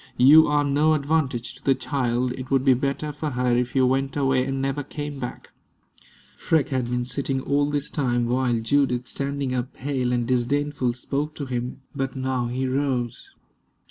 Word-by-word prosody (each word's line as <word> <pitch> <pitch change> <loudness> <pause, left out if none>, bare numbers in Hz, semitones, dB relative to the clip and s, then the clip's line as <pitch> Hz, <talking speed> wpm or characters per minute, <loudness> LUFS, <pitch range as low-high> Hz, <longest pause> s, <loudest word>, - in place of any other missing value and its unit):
You 150 +5 +8
are 150 0 +2
no 145 +2 +3
advantage 140 -5 -1
to - - -17
the 135 - +3
child. 125 -1 -1
It 130 0 -7
would 135 -1 +2
be 135 - +6
better 140 +4 -2
for 150 +1 -4
her 125 -2 +1
if 125 +1 -1
you 130 -1 +4
went 135 +2 0
away 135 -2 +2
and 135 0 -2
never 135 +1 -1
came 145 0 -6
back." 125 - -7 0.8
Freke 160 -3 +1
had 130 -3 0
been 125 0 -2
sitting 135 +1 -1
all 145 +2 +1
this 145 0 -2
time, 120 -4 0
while 125 0 +1
Judith, 125 0 +1
standing 140 -1 -3
up, 125 0 -3
pale 130 -2 -1
and 120 -1 0
disdainful, 130 +1 0
spoke 145 +5 -3
to 145 - -4
him. 125 +1 -4
But 135 0 -2
now 130 -2 -1
he 130 +2 -2
rose. 130 -3 -2
135 Hz, 180 wpm, -24 LUFS, 125-145 Hz, 0.8 s, You